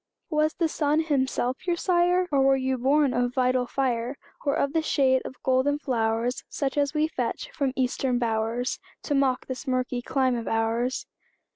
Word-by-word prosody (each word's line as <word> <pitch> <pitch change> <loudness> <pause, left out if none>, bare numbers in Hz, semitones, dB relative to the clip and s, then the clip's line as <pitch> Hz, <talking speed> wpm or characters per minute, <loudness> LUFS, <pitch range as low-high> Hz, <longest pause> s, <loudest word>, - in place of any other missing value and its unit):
Was 305 0 +1
the 335 - +1
sun 305 0 +1
himself 265 -1 -1
your 350 - +2
sire? 355 +1 +2
Were 270 -1 +4
ye 265 0 0
born 270 +2 +2
of 245 0 0
vital 255 -1 +2
fire? 250 0 -1 0.3
Or 285 0 +1
of 280 -2 0
the 325 - +2
shade 265 -4 +2
of - - -7
golden 260 +3 +2
flowers, 235 -3 -1
Such 270 -2 -2
as 290 +1 0
we 305 +1 +2
fetch - - -3
from 275 -3 -1
Eastern 255 0 0
bowers, 230 +1 -1 0.2
To 290 - -2
mock 270 -2 +1
this 260 +2 -6
murky 255 -1 -1
clime 260 0 +1
of 230 -1 -4
ours? 225 +3 0
265 Hz, 170 wpm, -26 LUFS, 245-290 Hz, 0.3 s, Were